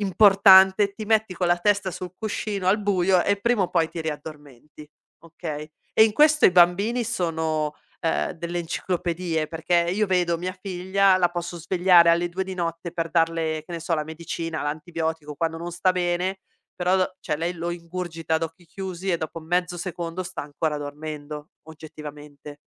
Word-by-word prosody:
importante, 195 0 +6
ti 215 - -6
metti 220 -2 +1
con 180 0 -1
la 175 0 +3
testa 200 0 +1
sul 180 +1 -6
cuscino 210 -3 -3
al 205 +3 +3
buio 185 -2 +3
e 200 0 0
prima 235 -2 +2
o 180 - 0
poi 165 -2 +2
ti 165 - -6
riaddormenti, 150 -2 -8 0.4
okay. 155 -2 -7 0.2
E - - +7
in 220 - +1
questo 305 +3 +4
i - - +8
bambini 190 +7 +3
sono, 160 -8 -1 0.3
ehm, 165 - 0
delle 170 +1 -4
enciclopedie, 170 -1 -2
perché 170 +1 +1
io 210 +4 +1
vedo 175 -2 +1
mia 180 +2 -4
figlia, 190 +1 +2
la 175 -2 +2
posso 175 0 -5
svegliare 175 0 +5
alle 170 +1 +2
2 185 +2 -3
di 190 - -6
notte 170 -1 -4
per 165 -1 -2
darle, 165 -2 0
che 175 - -10
ne 170 - -4
so, 170 +1 -1
la 155 -1 -2
medicina, 160 0 -5
l'antibiotico 155 0 -3
quando 165 +1 -2
non 170 +1 -6
sta 185 +2 +2
bene, 180 +2 -1 0.3
però 180 +1 +1
do 185 0 -1
cioè, 150 -5 -2
lei 170 +2 -2
lo 170 0 -3
ingurgita 170 -1 -4
ad 160 - 0
occhi 165 +2 -6
chiusi 190 +1 -5
e 170 - +2
dopo 165 +1 -6
mezzo 175 +2 -1
secondo 170 0 -4
sta 185 -3 -6
ancora 150 +1 -2
dormendo, 150 0 -7 0.2
oggettivamente. 150 -2 -10
175 Hz, 175 wpm, -24 LUFS, 160-185 Hz, 0.4 s, i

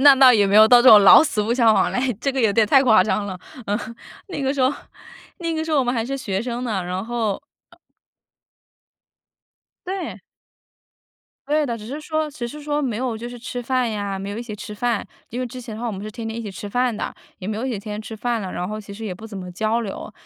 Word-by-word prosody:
那 280 0 +9
倒 260 -1 +7
也 205 -3 +4
没 200 +2 +3
有 215 - +9
到 240 +1 +7
这 255 - +7
种 210 -2 +10
老 - - +10
死 215 -9 0
不 230 +3 0
相 230 -3 +5
往 - - +2
来， - - 0 0.2
这 275 - 0
个 265 - -1
有 220 -3 +3
点 220 +1 +3
太 270 +5 +5
夸 220 -7 +6
张 210 0 -1
了， 185 -2 -6 0.3
嗯。 205 +2 0 0.5
那 325 -7 -5
个 270 +1 +1
时 280 - -3
候 255 +2 +3 0.7
那 335 -2 -2
个 315 0 -2
时 320 - -5
候 300 - +3
我 260 - +2
们 245 - 0
还 225 -2 -1
是 275 +2 -3
学 200 -5 -2
生 245 0 -4
呢， 205 -6 -1
然 180 +3 -4
后， 230 -4 -1 0.3
呃 - - -21 2.1
对。 375 -1 -4 1.3
对 300 0 +2
的。 235 -3 -2
只 210 - -10
是 280 +5 -5
说 310 0 -2
只 245 -5 -5
是 295 +5 -8
说 295 0 -1
没 240 -5 -1
有 250 -3 -2
就 235 +2 -7
是 245 0 -9
吃 245 +1 -5
饭 255 -1 0
呀， 200 -2 -3
没 195 - -5
有 205 - -5
一 - - -4
起 215 -3 -7
吃 210 0 -8
饭， 235 0 0 0.3
因 245 +2 -4
为 250 - -2
之 250 +2 -9
前 225 -3 -8
的 220 - -7
话 240 - -3
我 225 - -2
们 195 +1 -6
是 215 - -6
天 225 0 -6
天 225 +1 -5
一 - - -4
起 210 - -6
吃 205 +2 -7
饭 245 +2 0
的， - - -4 0.3
也 185 - -6
没 215 - -2
有 235 - -3
一 265 - -2
起 - - -2
天 210 +1 -7
天 210 - -5
吃 220 - -8
饭 235 +1 -2
了， 185 - -5
然 180 +1 -3
后 215 - -4
其 200 -1 -11
实 220 +2 -8
也 185 - -4
不 220 +5 -10
怎 210 -3 -9
么 180 -1 -7
交 220 +6 0
流。 205 -4 -6
230 Hz, 295 characters per minute, -22 LUFS, 210-255 Hz, 2.1 s, 种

